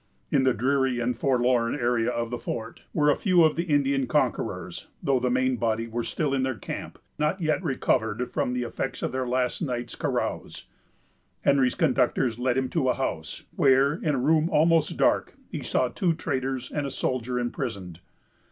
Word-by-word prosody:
In 130 - +3
the 130 - +4
dreary 130 +1 +1
and 120 +1 0
forlorn 120 -2 +1
area 120 -3 +1
of 120 -1 -2
the 120 - -3
fort 115 0 -5
were 150 -2 +3
a - - +2
few 180 -4 +4
of 155 -1 +4
the 170 - -1
Indian 140 -4 +1
conquerors, - - -1 0.2
though 135 -2 +2
the 125 0 0
main 130 0 +1
body 115 -1 0
were 115 +1 -3
still 150 +1 -1
in 135 - +1
their 130 -1 -1
camp, 100 - -7 0.2
not 150 +5 +1
yet 155 +1 0
recovered 125 - 0
from 125 - -1
the 125 0 -1
effects 120 - -4
of - - -1
their 130 0 -2
last 125 0 0
night's 120 -6 -3
carouse. - - -3 0.8
Henry's 135 -3 +3
conductors 130 -6 +1
led 125 0 +1
him 130 -1 +1
to 140 -6 +1
a - - +2
house, 80 - -4
where, 135 +1 +4
in 155 -2 -1
a - - -1
room 155 +5 +2
almost 165 -2 +3
dark, - - +2 0.2
he - - -4
saw 130 - +1
two 170 +5 0
traders 130 -5 -3
and 145 -2 -2
a - - -3
soldier 130 -2 -2
imprisoned. 100 -8 -4
130 Hz, 185 wpm, -26 LUFS, 120-145 Hz, 0.8 s, the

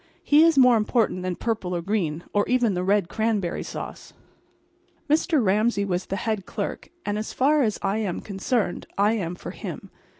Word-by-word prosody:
He 295 +1 +5
is 330 -3 +4
more 250 -3 +7
important 215 -3 +1
than 180 -1 -2
purple 205 -5 -2
or 170 - -3
green, 170 -5 -1
or 205 - +3
even 245 -4 +2
the 180 0 -1
red 195 -1 +2
cranberry 210 -3 -1
sauce. - - -7 0.9
Mr. 305 - +2
Ramsay 205 +1 +2
was 185 -1 -2
the 195 - -2
head 215 -2 -2
clerk; - - -4 0.2
and 205 +1 -1
as 215 - -5
far 290 +3 +3
as 215 -5 +1
I 195 +1 +1
am 205 -5 -2
concerned 200 0 -2
I 205 +2 +3
am 180 -6 -2
for - - -8
him. - - -8
210 Hz, 180 wpm, -25 LUFS, 185-235 Hz, 0.9 s, more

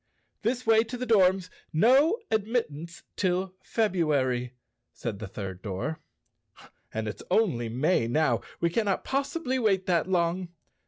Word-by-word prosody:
"This 245 +3 -1
way 225 0 +5
to 230 +2 -6
the 255 - -3
Dorms. 190 -5 +3 0.2
No 265 - +5
admittance 195 -8 -2
till 185 0 0
Febru¬ 185 -10 +1
ary," 125 -2 -1 0.4
said 110 -5 -5
the 110 - -5
third 95 -2 -6
door. 115 +11 -4 0.9
"And 110 0 -3
it's 105 - -5
only 170 - +2
May 125 +1 +1
now. 155 +7 +2 0.2
We 170 0 +1
cannot 205 0 0
possibly 275 0 -1
wait 195 -5 +2
that 175 0 +1
long." 180 0 +1
180 Hz, 140 wpm, -28 LUFS, 130-225 Hz, 0.9 s, way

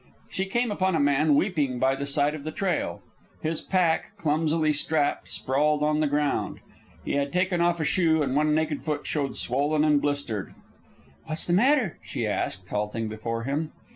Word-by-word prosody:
She 190 +1 -2
came 240 +3 0
upon 190 -3 +1
a - - +2
man 145 +1 +3
weeping 145 -7 +1
by 130 +2 +2
the 140 +1 -4
side 145 +1 +2
of 155 -2 -7
the 155 - -3
trail. 180 0 -2 0.4
His 160 0 -1
pack, 185 +3 0
clumsily 155 -1 +1
strapped, 150 0 0
sprawled 150 +3 +1
on 150 0 +2
the 155 - +2
ground. 145 0 -1 0.5
He - - -2
had 140 0 0
taken 180 -1 +1
off 170 0 +2
a 155 - 0
shoe, 160 -2 +2
and 130 -1 -1
one 150 +1 +3
naked 155 -2 -1
foot 150 -2 -2
showed 140 -3 -2
swollen 145 +4 0
and 150 -2 +3
blistered. 140 -9 -3 0.7
"What 155 0 -3
is - - +2
the 175 - 0
matter?" 245 - +3
she - - -4
asked, 95 -1 -2
halting 105 +2 -2
before 115 +2 -4
him. 145 +5 -2
150 Hz, 185 wpm, -26 LUFS, 140-165 Hz, 0.7 s, man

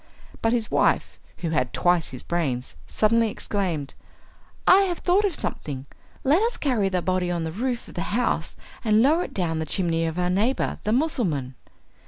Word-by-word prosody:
But 225 - +2
his 235 -2 0
wife, - - +1 0.2
who 165 -2 -3
had 125 -5 0
twice 175 -2 +2
his 130 - -8
brains, 135 - -2
suddenly 230 - +2
exclaimed, 175 -10 -3 0.7
"I 385 - +7
have 350 -3 -2
thought 380 +4 +2
of 380 -6 0
something! 135 - -4 0.4
Let 295 +8 +4
us 465 +2 0
carry 235 -9 +1
the 180 -2 -1
body 185 -1 0
on 170 -1 -1
the 160 - -3
roof 240 +6 -3
of - - -12
the 175 - -3
house 245 +4 0 0.3
and 220 -1 +4
lower 315 +6 +3
it - - -10
down 165 -4 -1
the 160 - -2
chimney 165 -1 +1
of 160 +1 -4
our 180 0 +1
neighbour 220 +8 0
the 210 - +1
Mussulman." 220 - 0
190 Hz, 185 wpm, -25 LUFS, 165-245 Hz, 0.7 s, I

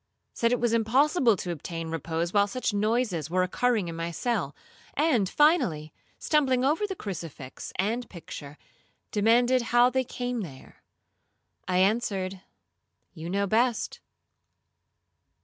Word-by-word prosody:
said 230 0 +1
it 245 - +2
was 235 -1 +1
impossible 245 - +3
to 175 - -4
obtain 165 +1 -5
repose 165 +2 -2
while 205 -1 +4
such 250 0 -2
noises 210 - 0
were 185 +2 +2
occurring 220 +1 +1
in 165 - -5
my 165 0 -3
cell; 170 - -2 0.4
and, 265 - +2
finally, 250 - +2 0.2
stumbling 265 -4 +2
over 320 +9 +1
the 385 - -4
crucifix 165 - -7
and 225 +6 -1
picture, 150 -4 -9 0.5
demanded 240 +4 +3
how 240 +1 +4
they 260 0 +1
came 245 -1 -3
there. 140 -9 -11 0.9
I 180 - +1
answered, 195 -2 +1 0.7
'You 165 -1 -7
know 200 +2 +1
best.' 230 +3 +1
215 Hz, 130 wpm, -27 LUFS, 175-245 Hz, 0.9 s, while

